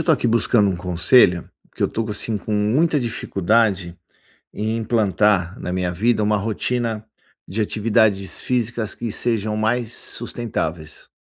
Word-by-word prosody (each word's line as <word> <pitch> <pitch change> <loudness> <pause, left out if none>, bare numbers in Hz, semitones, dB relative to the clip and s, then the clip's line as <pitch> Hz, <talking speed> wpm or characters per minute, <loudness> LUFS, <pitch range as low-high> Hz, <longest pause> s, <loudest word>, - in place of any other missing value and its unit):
estou 160 - +3
aqui 140 - +1
buscando 115 -2 +3
um 95 - 0
conselho. 90 +1 +3 0.2
Porque - - -6
eu - - +1
tô 115 -1 -3
assim 105 +1 -1
com 105 - -5
muita 130 +10 +2
dificuldade 100 -5 0 0.6
em 110 +2 -2
implantar 105 -5 +1
na 90 - -5
minha 90 -1 -1
vida, 110 +6 +1
uma 105 0 +2
rotina 110 +1 -2 0.4
de 105 +5 -4
atividades 105 -2 +1
físicas 120 -3 -1
que 115 -2 -5
sejam 110 -2 -1
mais 115 +2 0
sustentáveis. 85 -10 -4
110 Hz, 140 wpm, -21 LUFS, 95-115 Hz, 0.6 s, estou